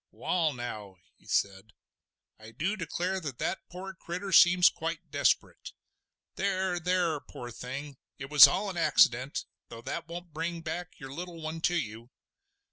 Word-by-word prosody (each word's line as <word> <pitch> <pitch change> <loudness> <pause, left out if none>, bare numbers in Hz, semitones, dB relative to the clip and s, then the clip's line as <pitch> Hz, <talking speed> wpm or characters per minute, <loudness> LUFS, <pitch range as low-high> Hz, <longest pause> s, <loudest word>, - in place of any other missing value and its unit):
"Wall, 165 -4 0
now!" 110 -6 -7 0.2
he - - -23
said, 100 +1 -1 0.7
"I 110 0 -11
du 175 - -2
declare 185 +1 -2
that 140 -7 -6
that 190 - -2
poor 190 +2 -7
critter 185 +1 -6
seems 180 -1 +7
quite 165 -1 -3
desperate. 145 -1 0 0.6
There! 190 -2 0
there! 175 -3 +1
poor 120 -3 -9
thing, 135 +4 -7 0.2
it 135 +1 -8
was 145 -4 +11
all 200 0 -1
an 180 - -8
accident—though 130 -5 +1
that 165 +5 -5
won't 170 -1 -8
bring 165 +2 -3
back 175 +2 -6
your 135 -3 -8
little 175 +1 -7
one 160 +1 -5
to 175 - -1
you. 115 -6 -4
165 Hz, 150 wpm, -29 LUFS, 135-180 Hz, 0.7 s, was